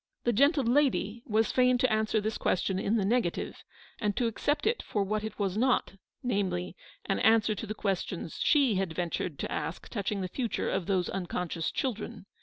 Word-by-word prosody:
The 240 Hz, -, +2 dB
gentle 280 Hz, +5 st, +4 dB
lady 240 Hz, -3 st, +2 dB
was 220 Hz, 0 st, +2 dB
fain 250 Hz, 0 st, +4 dB
to 250 Hz, -2 st, +2 dB
answer 215 Hz, 0 st, +2 dB
this 215 Hz, +1 st, -2 dB
question 190 Hz, +1 st, +1 dB
in 205 Hz, +3 st, +1 dB
the 205 Hz, -4 st, +1 dB
negative, 230 Hz, -4 st, -1 dB, 0.4 s
and 205 Hz, -3 st, -1 dB
to 245 Hz, -, +2 dB
accept 290 Hz, +6 st, 0 dB
it 450 Hz, +2 st, +1 dB
for 205 Hz, -, -1 dB
what 210 Hz, +2 st, -1 dB
it 220 Hz, -, -5 dB
was 195 Hz, -2 st, -1 dB
not; 255 Hz, -1 st, +2 dB, 0.3 s
namely, 185 Hz, -7 st, -1 dB, 0.3 s
an 195 Hz, -, 0 dB
answer 220 Hz, -1 st, +4 dB
to 215 Hz, +2 st, -6 dB
the 215 Hz, -, -4 dB
questions 190 Hz, -5 st, -3 dB
she 270 Hz, -9 st, +4 dB
had 190 Hz, -4 st, -1 dB
ventured 175 Hz, -3 st, -2 dB
to -, -, -4 dB
ask 155 Hz, +2 st, -4 dB
touching 200 Hz, -1 st, -2 dB
the 185 Hz, -, -2 dB
future 235 Hz, +5 st, -2 dB
of 175 Hz, -, -1 dB
those 185 Hz, -3 st, +1 dB
un 190 Hz, -2 st, -3 dB
conscious 170 Hz, -2 st, -2 dB
children. 225 Hz, -7 st, -3 dB
215 Hz, 195 wpm, -30 LUFS, 190-240 Hz, 0.4 s, gentle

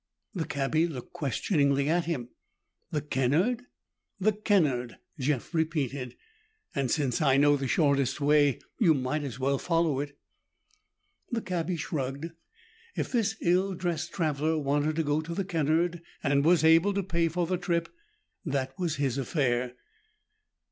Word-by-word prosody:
The 170 Hz, -6 st, -2 dB
cabbie 150 Hz, +4 st, +1 dB
looked 130 Hz, -7 st, -8 dB
questioningly 140 Hz, -, +1 dB
at 170 Hz, +2 st, +2 dB
him. 135 Hz, -8 st, -3 dB, 0.6 s
"The 150 Hz, -, -1 dB
Kennard?" 155 Hz, -, +1 dB, 0.5 s
"The 210 Hz, +3 st, +3 dB
Kennard," 160 Hz, -, +1 dB, 0.2 s
Jeff 135 Hz, +3 st, -1 dB
repeated, 140 Hz, -6 st, -1 dB, 0.6 s
"and 135 Hz, -3 st, -1 dB
since 135 Hz, -3 st, 0 dB
I 135 Hz, -3 st, +4 dB
know 145 Hz, +1 st, +5 dB
the 135 Hz, -1 st, -2 dB
shortest 140 Hz, -3 st, +2 dB
way, 145 Hz, -2 st, +4 dB, 0.2 s
you 170 Hz, -8 st, +5 dB
might 135 Hz, +3 st, -1 dB
as 130 Hz, -5 st, -5 dB
well 135 Hz, +1 st, 0 dB
follow 165 Hz, -5 st, +1 dB
it." 145 Hz, 0 st, -5 dB, 1.1 s
The 235 Hz, -1 st, -1 dB
cabbie 175 Hz, -1 st, -2 dB
shrugged; 145 Hz, 0 st, -3 dB, 0.6 s
if -, -, -2 dB
this 220 Hz, -3 st, +1 dB
ill 185 Hz, +2 st, +2 dB
dressed 170 Hz, -2 st, -2 dB
traveler 155 Hz, -1 st, 0 dB
wanted 145 Hz, +1 st, 0 dB
to 165 Hz, -, +1 dB
go 145 Hz, +1 st, +1 dB
to 165 Hz, +2 st, -6 dB
the 195 Hz, -, -1 dB
Kennard, 165 Hz, 0 st, +1 dB, 0.2 s
and 140 Hz, -1 st, +2 dB
was 170 Hz, +1 st, +4 dB
able 165 Hz, +5 st, +5 dB
to 200 Hz, -, 0 dB
pay 170 Hz, -2 st, +1 dB
for 175 Hz, +2 st, -1 dB
the 180 Hz, +2 st, -1 dB
trip, 170 Hz, -2 st, 0 dB, 0.6 s
that 135 Hz, -5 st, -2 dB
was 170 Hz, -4 st, 0 dB
his 140 Hz, -2 st, -1 dB
affair. 125 Hz, -3 st, 0 dB
155 Hz, 150 wpm, -28 LUFS, 140-170 Hz, 1.1 s, know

